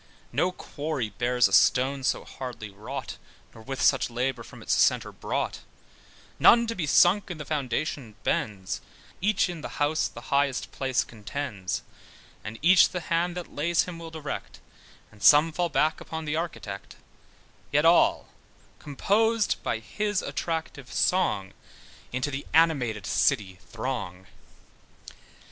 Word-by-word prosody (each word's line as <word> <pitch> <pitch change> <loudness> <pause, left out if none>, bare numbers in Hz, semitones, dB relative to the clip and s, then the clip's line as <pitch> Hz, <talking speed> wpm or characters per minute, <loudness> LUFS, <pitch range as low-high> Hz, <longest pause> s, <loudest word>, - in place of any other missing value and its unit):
No 185 - +1
quarry 145 -8 -4
bears 125 +4 +2
a - - -7
stone 135 +1 +4
so - - 0
hardly 120 -5 -7
wrought, 125 +7 -7 0.4
Nor 110 - -13
with 135 +3 -6
such 135 - +3
labour 125 +1 -2
from - - -12
its - - 0
centre - - +3
brought; - - -3 0.8
None 235 0 +7
to 230 - -2
be 175 -8 -3
sunk 185 +7 +4
in 175 - -5
the 150 - -7
foundation 140 -4 -3
bends, 95 -3 -2 0.4
Each 200 0 +2
in 175 -3 -6
the - - -7
house 150 +2 +1
the 120 +4 -8
highest 140 -2 +1
place 130 -1 0
contends, 105 - -5 0.6
And 110 +1 -7
each 180 +2 +7
the 180 - -3
hand 175 +1 +1
that 175 - -7
lays 170 +3 +2
him 175 -2 -7
will 165 -1 -8
direct, 160 -3 -6 0.5
And 105 - -19
some 150 +6 +7
fall 175 +2 -1
back 155 +2 +1
upon 160 0 -6
the 150 0 -1
architect; 140 - -5 0.8
Yet 150 +2 +3
all 170 +1 +4 0.5
composed 210 +9 +1
by 115 - -1
his 205 - -2
attractive 160 -5 -4
song, 100 - +1 0.6
Into 130 +3 -2
the 135 +1 -5
animated 135 -10 +3
city 100 -9 +1
throng. 110 -7 -4
140 Hz, 140 wpm, -27 LUFS, 120-165 Hz, 0.8 s, None